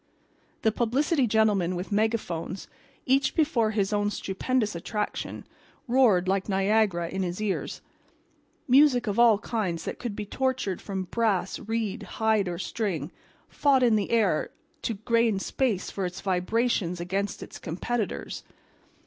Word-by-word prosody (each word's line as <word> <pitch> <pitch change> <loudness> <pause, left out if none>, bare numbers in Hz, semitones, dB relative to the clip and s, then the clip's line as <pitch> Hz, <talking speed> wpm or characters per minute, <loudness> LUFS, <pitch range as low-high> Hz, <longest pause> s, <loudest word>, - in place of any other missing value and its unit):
The 220 - +4
publicity 255 +5 +1
gentlemen 205 -5 +2
with 180 +3 -5
megaphones, 205 -5 -1 0.4
each 270 +1 +2
before 275 -9 +2
his 210 -1 0
own 205 0 +1
stupendous 210 +3 -1
attraction, 210 +5 -4 0.4
roared 235 -8 +4
like 195 +1 0
Niagara 195 -3 +2
in 190 +3 -3
his 180 0 -3
ears. 210 -3 -3 0.8
Music 260 -2 +5
of 210 +2 -1
all 235 -3 +7
kinds 200 -7 -3
that - - -5
could 235 -4 -4
be 210 - -4
tortured 260 -5 -1
from 190 -2 -3
brass, 195 -1 0
reed, 220 -1 -2
hide 215 0 +1
or 175 -1 -3
string, 180 - -3 0.4
fought 275 -3 +3
in 235 -3 +5
the 205 -2 0
air 210 -9 +2 0.3
to 230 - -2
gain 230 0 +2
space 210 -1 -1
for 195 - -3
its 180 +1 -4
vibrations 190 -1 0
against 195 +3 -2
its - - -10
competitors. 205 +6 -3
210 Hz, 140 wpm, -27 LUFS, 190-235 Hz, 0.8 s, all